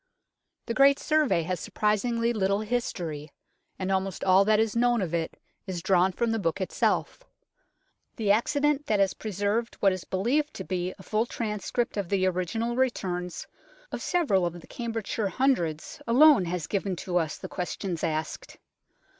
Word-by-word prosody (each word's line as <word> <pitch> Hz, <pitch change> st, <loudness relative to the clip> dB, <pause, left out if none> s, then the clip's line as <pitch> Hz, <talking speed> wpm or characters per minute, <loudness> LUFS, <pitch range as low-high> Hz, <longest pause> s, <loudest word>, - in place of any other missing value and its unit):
The 230 Hz, -, -2 dB
great 275 Hz, +2 st, +5 dB
Survey 305 Hz, -, +2 dB
has 180 Hz, +1 st, -2 dB
surprisingly 230 Hz, +4 st, 0 dB
little 200 Hz, -1 st, +1 dB
history, 175 Hz, -10 st, -3 dB, 0.5 s
and 190 Hz, 0 st, -2 dB
almost 190 Hz, -1 st, -1 dB
all 190 Hz, +1 st, +5 dB
that 215 Hz, 0 st, +4 dB
is 220 Hz, -1 st, +1 dB
known 240 Hz, 0 st, +3 dB
of 180 Hz, -4 st, -3 dB
it 165 Hz, -1 st, -2 dB, 0.3 s
is 175 Hz, -3 st, -4 dB
drawn 190 Hz, 0 st, +3 dB
from 230 Hz, +5 st, -1 dB
the 225 Hz, -, 0 dB
book 170 Hz, -1 st, -1 dB
itself. 190 Hz, -, -1 dB, 0.9 s
The 215 Hz, -4 st, +1 dB
accident 290 Hz, +6 st, +1 dB
that 210 Hz, -2 st, +2 dB
has 195 Hz, -2 st, +3 dB
preserved 210 Hz, +3 st, -2 dB
what 195 Hz, -, +3 dB
is 185 Hz, -, -5 dB
believed 255 Hz, +11 st, 0 dB
to -, -, -5 dB
be 180 Hz, -1 st, -2 dB
a 190 Hz, -, -13 dB
full 215 Hz, +5 st, 0 dB
transcript 220 Hz, +1 st, -2 dB
of 195 Hz, -4 st, -2 dB
the 195 Hz, -2 st, +2 dB
original 185 Hz, +6 st, -1 dB
returns 180 Hz, -9 st, -2 dB, 0.5 s
of -, -, -4 dB
several 295 Hz, -, +1 dB
of 175 Hz, 0 st, -2 dB
the -, -, -14 dB
Cambridgeshire 225 Hz, -3 st, -3 dB
Hundreds 175 Hz, -, 0 dB
alone 265 Hz, -3 st, +6 dB
has 175 Hz, -2 st, -3 dB
given 195 Hz, +1 st, -2 dB
to 180 Hz, +1 st, -2 dB
us 160 Hz, -3 st, -1 dB
the -, -, -7 dB
questions 180 Hz, -1 st, -4 dB
asked. 155 Hz, -1 st, -3 dB
200 Hz, 165 wpm, -27 LUFS, 180-235 Hz, 0.9 s, alone